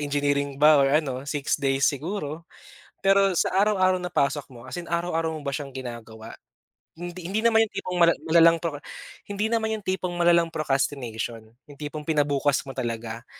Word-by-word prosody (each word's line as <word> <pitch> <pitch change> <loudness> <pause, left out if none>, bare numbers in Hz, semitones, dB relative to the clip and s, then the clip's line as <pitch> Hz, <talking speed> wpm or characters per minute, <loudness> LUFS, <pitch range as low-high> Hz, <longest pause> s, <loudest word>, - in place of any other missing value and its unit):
engineering 145 -1 0
ba 150 0 +6
or 135 - +4
ano 135 -3 0
6 145 -2 -1
days 135 0 +1
siguro. 155 +1 -2 0.6
Pero 195 -2 +4
sa - - +1
araw-araw 185 -3 +2
na 180 - -4
pasok 140 -3 0
mo, 120 -1 -13
as 175 +7 -6
in 170 - -12
araw-araw 165 -2 -1
mo - - -9
ba 140 - -2
siyang 140 0 -4
ginagawa? 115 -4 -8 0.6
Hindi 175 +1 -7
hindi 205 +4 -1
naman 225 -1 +4
yung - - -20
tipong 180 0 -4
mala 170 -1 +5
malalang 165 0 +5
proc 155 -4 -3 0.5
hindi 205 +2 -2
naman 220 -1 0
yung 215 - -6
tipong 185 -1 -2
malalang 170 -1 +3
procrastination, 120 -6 -2 0.2
yung 145 -1 -15
tipong 150 0 -6
pina 155 -2 +3
bukas 145 -1 +1
mo 135 -1 -10
talaga. 115 -1 -4
150 Hz, 180 wpm, -25 LUFS, 135-175 Hz, 0.6 s, ba